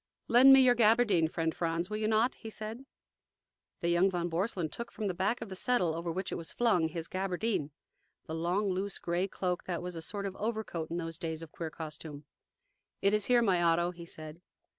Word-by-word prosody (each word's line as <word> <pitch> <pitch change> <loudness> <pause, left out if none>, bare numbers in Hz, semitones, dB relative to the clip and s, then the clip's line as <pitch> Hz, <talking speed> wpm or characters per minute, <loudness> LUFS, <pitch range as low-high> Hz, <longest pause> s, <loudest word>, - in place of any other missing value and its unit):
"Lend 250 +3 +8
me 270 - +9
your 255 -1 +6
gabardine, 220 -7 +4
friend 165 0 -1
Franz, 170 +1 -1
will 215 - -3
you 215 0 0
not?" 220 +3 +3
he 225 - -9
said. 220 +5 -7 0.9
The 170 - 0
young 175 +3 +4
von 175 -2 -2
Borselen 175 0 -1
took 235 +9 -6
from 215 - -5
the 190 - 0
back 195 +7 0
of - - -6
the 190 - -6
settle, 185 -5 +1
over 170 +1 -3
which 185 +3 -3
it - - -3
was 165 - -6
flung, 215 -9 +2
his 160 +1 -5
gabardine 190 -3 -1 0.6
the 160 - -6
long, 180 +5 0
loose 190 +1 -2
gray 175 +2 -1
cloak 180 -2 -3
that 175 -2 -3
was 180 -1 -4
a 165 - -5
sort 200 +5 -4
of 195 -1 -4
overcoat 215 -7 -3
in 170 - -3
those 165 -1 -4
days 160 -2 -3
of 160 - -11
queer 165 -2 -5
costume. 155 -2 -8 0.8
"It 200 +1 +4
is 210 -1 +2
here, 245 -1 +4
my 185 -5 +3
Otto," 170 +1 +3
he 170 -1 -11
said. 155 0 -8
180 Hz, 215 wpm, -31 LUFS, 165-215 Hz, 0.9 s, me